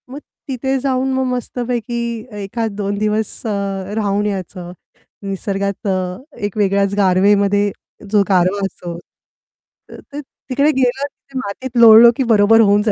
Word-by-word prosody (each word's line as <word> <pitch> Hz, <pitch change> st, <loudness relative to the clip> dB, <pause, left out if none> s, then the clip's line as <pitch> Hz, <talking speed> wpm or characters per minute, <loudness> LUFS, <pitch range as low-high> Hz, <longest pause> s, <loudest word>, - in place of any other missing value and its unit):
मग 275 Hz, +3 st, -8 dB, 0.3 s
तिथे 265 Hz, 0 st, -2 dB
जाऊन 265 Hz, 0 st, -1 dB
मग 260 Hz, 0 st, 0 dB
मस्तपैकी 245 Hz, -1 st, -3 dB, 0.5 s
एखाद 225 Hz, +3 st, -3 dB
2 200 Hz, 0 st, -3 dB
दिवस 215 Hz, +2 st, -2 dB
अ, 200 Hz, -1 st, -3 dB
राहून 205 Hz, -1 st, 0 dB
यायचं. 185 Hz, -3 st, -5 dB, 0.5 s
निसर्गात 200 Hz, +1 st, -3 dB
अ, 185 Hz, -1 st, -2 dB, 0.3 s
एक 205 Hz, 0 st, -5 dB
वेगळ्याच 200 Hz, -1 st, +1 dB
गारवेमध्ये 200 Hz, +1 st, +3 dB, 0.4 s
जो 210 Hz, -1 st, +4 dB
गारवा 190 Hz, +1 st, +2 dB
असतो. 175 Hz, -3 st, -7 dB, 0.9 s
तर -, -, -11 dB
ते 290 Hz, -, -5 dB
तिकडे 280 Hz, +1 st, -1 dB
गेलो 265 Hz, 0 st, 0 dB
तिथे 275 Hz, -1 st, -13 dB
मातीत 250 Hz, +3 st, -6 dB
लोळलो, 230 Hz, +1 st, +9 dB
की 265 Hz, -, +1 dB
बरोबर 215 Hz, +1 st, +5 dB
होऊन 205 Hz, -1 st, +4 dB
जा 215 Hz, -, +1 dB
205 Hz, 140 wpm, -17 LUFS, 195-245 Hz, 0.9 s, लोळलो